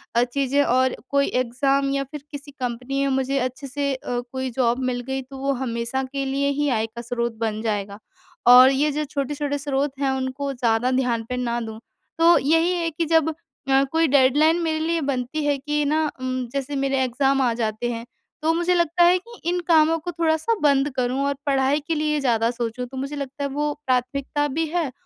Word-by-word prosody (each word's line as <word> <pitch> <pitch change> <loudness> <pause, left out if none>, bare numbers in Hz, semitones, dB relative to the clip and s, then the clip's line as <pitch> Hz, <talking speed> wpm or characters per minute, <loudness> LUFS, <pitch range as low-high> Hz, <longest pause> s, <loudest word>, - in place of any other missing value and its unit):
अ, 235 - +5
चीज़ें 275 +3 +1
और 260 0 +2
कोई 280 0 +2
एग्ज़ाम 275 +3 +1
या 275 0 0
फिर 280 +1 -9
किसी 285 0 -8
कंपनी 255 +1 -3
में 275 - 0
मुझे 265 +1 0
अच्छे 255 +2 -4
से 280 +1 -1
अ, 245 -1 -3
कोई 260 0 -3
जॉब 240 0 +1
मिल 250 -1 -1
गई 265 0 -2
तो 265 +1 -11
वो 275 +1 0
हमेशा 235 +2 -2
के 275 -1 -2
लिए 275 +1 0
ही 290 - +2
आय 225 -3 +1
का 235 +2 -9
स्रोत 235 -1 -2
बन 220 -1 -2
जाएगा। 205 -2 -3 0.5
और 250 +1 +9
ये 290 +3 +1
जो 300 +1 -1
छोटे-छोटे 285 0 -2
स्रोत 280 0 -1
हैं 275 -1 +1
उनको 265 +2 -3
ज़्यादा 245 0 +1
ध्यान 250 -3 0
पे 250 - -2
ना 240 -1 -1
दूँ। 220 -1 -7 0.4
तो 335 +1 +6
यही 325 +6 +2
है 335 - 0
कि 330 +2 -2
जब 320 0 +2 0.4
अ, 270 0 +5
कोई 325 0 +3
डेडलाइन 290 +4 +4
मेरे 320 -1 0
लिए 330 +1 0
बनती 275 +2 -2
है 290 -1 +2
कि 295 +2 -1
ना 305 +2 +1 0.2
उम, 255 0 -2
जैसे 280 +1 -3
मेरे 270 -1 0
एग्ज़ाम 270 +2 +1
आ 245 -3 +2
जाते 225 +1 -2
हैं, 230 0 -5 0.4
तो 320 +1 +2
मुझे 345 +2 +1
लगता 345 0 +3
है 350 +1 +6
कि 470 +6 -13
इन 355 0 0
कामों 325 -1 +4
को 350 +3 -5
थोड़ा-सा 330 +6 +1
बंद 280 -1 +3
करूँ 255 +1 0
और 280 - +1
पढ़ाई 275 +1 +2
के 330 - 0
लिए 300 0 0
ज़्यादा 230 -4 +2
सोचूँ। 240 0 -4
तो 260 +2 -10
मुझे 275 +3 -4
लगता 280 0 -5
है 280 - -1
वो 295 +2 -1
प्राथमिकता 265 +3 0
भी 325 - +2
है 325 -6 0
275 Hz, 210 wpm, -23 LUFS, 250-295 Hz, 0.5 s, और